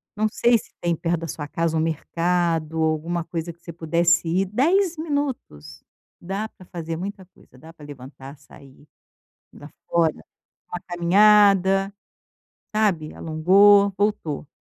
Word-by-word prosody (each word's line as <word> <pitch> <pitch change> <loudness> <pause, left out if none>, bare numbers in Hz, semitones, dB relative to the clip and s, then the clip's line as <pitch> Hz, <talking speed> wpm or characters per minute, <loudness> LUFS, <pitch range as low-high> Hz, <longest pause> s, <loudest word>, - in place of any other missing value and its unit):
Não 215 +1 +1
sei 235 +2 +2
se - - -13
tem 170 -1 0
perto 170 0 -2
da 165 - -5
sua 145 -1 -6
casa 165 -1 -1
um - - +1
mercado 165 0 -1
ou 160 - +2
alguma 165 +2 -3
coisa 165 -1 -5
que 170 - -34
você 170 - -9
pudesse 170 +1 +1
ir, 185 +4 +1
10 335 - +1
minutos, 270 - -5 0.4
dá 195 +5 -4
pra 185 - -18
fazer 165 -3 -6
muita 195 +1 -7
coisa, 130 - -23
dá 160 +4 -14
pra 160 -3 -15
levantar, 135 0 -11
sair, 140 0 -18 0.7
ir - - -15
lá 145 - -11 0.2
fora, 165 -2 +2 0.5
uma 180 - -6
caminhada, 195 +2 +4 0.8
sabe, 190 -8 0
alongou, 195 +5 +4
voltou. 200 -9 -2
170 Hz, 150 wpm, -23 LUFS, 160-200 Hz, 0.8 s, caminhada